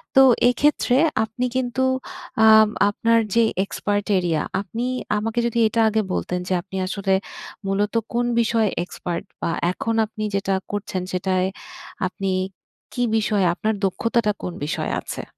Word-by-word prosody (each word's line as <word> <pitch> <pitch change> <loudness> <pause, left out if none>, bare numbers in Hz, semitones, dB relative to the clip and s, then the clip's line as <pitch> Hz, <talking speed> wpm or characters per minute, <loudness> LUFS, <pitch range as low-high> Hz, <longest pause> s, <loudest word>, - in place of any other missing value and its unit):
তো 270 - +8 0.3
এইক্ষেত্রে 255 0 +2 0.3
আপনি 235 +3 -3
কিন্তু 260 0 0 0.6
আ - - +7 0.4
আপনার 230 +2 +2 0.2
যে 230 - +5 0.2
এক্সপার্ট 205 0 -2
এরিয়া 165 -4 0 0.2
আপনি 225 +5 -4 0.3
আমাকে 225 +3 -1
যোদি 235 0 0
এটা 230 +1 +1
আগে 220 0 +1
বলতেন 180 0 -2
যে - - +1
আপনি 190 +1 -8
আসলে 195 0 -1 0.5
মূলত 200 +2 0 0.2
কোন 240 +1 +1 0.2
বিষয়ে 225 -2 +2
এক্সপার্ট 175 -1 -5 0.2
বা - - 0 0.2
এখন 225 +4 -2
আপনি 215 0 -7
যেটা 195 0 0 0.2
করছেন 205 -2 -3
সেটায় 185 0 +1 0.6
আপনি 195 +1 -3 0.6
কি 245 - 0
বিষয়ে 210 -3 +1
আপনার 215 +4 -1
দক্ষতাটা 230 +3 +1
কোন 180 - -3
বিষয়ে 155 0 -2
আছে? - - -6
210 Hz, 140 wpm, -22 LUFS, 190-230 Hz, 0.6 s, তো